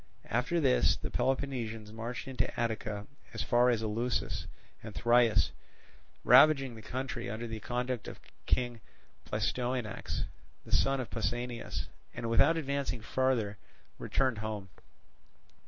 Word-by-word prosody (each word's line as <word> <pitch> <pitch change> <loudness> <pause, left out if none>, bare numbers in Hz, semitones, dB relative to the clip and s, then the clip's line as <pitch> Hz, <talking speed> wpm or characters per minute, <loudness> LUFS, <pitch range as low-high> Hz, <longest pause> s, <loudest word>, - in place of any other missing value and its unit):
After 125 +10 +1
this 135 -5 +4
the - - -5
Peloponnesians 115 -6 -1
marched 115 +4 -5
into 130 -1 -2
Attica 110 -3 -2 0.3
as 110 - -1
far 120 +4 +4
as 115 -2 +1
Eleusis 115 +3 -1 0.3
and 110 -1 -9
Thrius, 120 -2 +4 0.7
ravaging 135 0 +7
the 110 - -10
country 125 0 -4
under 110 +3 -4
the 115 -1 -5
conduct 125 +1 -2
of - - -8 0.3
King 120 -3 +1 0.4
Pleistoanax, 125 -3 -2 0.4
the - - -12
son 135 0 +3
of 125 - -4
Pausanias, 120 +1 -2 0.3
and 115 -1 -3
without 145 +8 +5
advancing 140 -5 -2
further 115 -4 0 0.4
returned 130 -5 0
home. 105 -3 -4
120 Hz, 125 wpm, -32 LUFS, 110-130 Hz, 0.7 s, ravaging